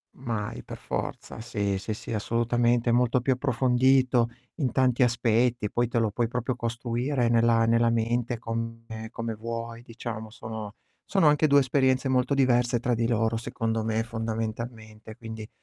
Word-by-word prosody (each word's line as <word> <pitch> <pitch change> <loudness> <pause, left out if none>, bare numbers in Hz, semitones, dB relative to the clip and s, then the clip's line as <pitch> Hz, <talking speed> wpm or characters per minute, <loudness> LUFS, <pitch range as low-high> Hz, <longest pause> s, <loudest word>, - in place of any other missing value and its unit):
Mai, 115 -5 -4
per - - -8
forza. 110 - -5
Sì, 100 -4 -2
sì, 110 +2 -4
sì, 115 - -7
assolutamente, 120 +2 +1
è - - +2
molto 125 +1 +3
più 130 +2 +2
approfondito 130 -1 +3 0.3
in 135 -7 -1
tanti 130 -1 +2
aspetti, 120 -2 +2
poi 120 0 +1
te 120 - -2
lo 115 -2 +2
puoi 115 +2 0
proprio 125 +1 -2
costruire 120 +2 -1
nella 115 -1 +4
nella 115 0 +3
mente 115 +1 0
come 115 -1 -5
come 115 -1 -4
vuoi, 115 +1 -6
diciamo. 115 -2 -7
Sono 110 -1 -7 0.3
sono 190 -6 +2
anche 150 +1 +4
2 140 -1 +6
esperienze 130 0 +2
molto 130 +2 +2
diverse 120 -2 +3
tra 120 0 0
di 115 0 +1
loro, 115 -1 +1
secondo 115 -1 -2
me, 110 0 0
fondamentalmente, 110 -1 -5
quindi 110 -2 -8
115 Hz, 155 wpm, -27 LUFS, 115-125 Hz, 0.3 s, 2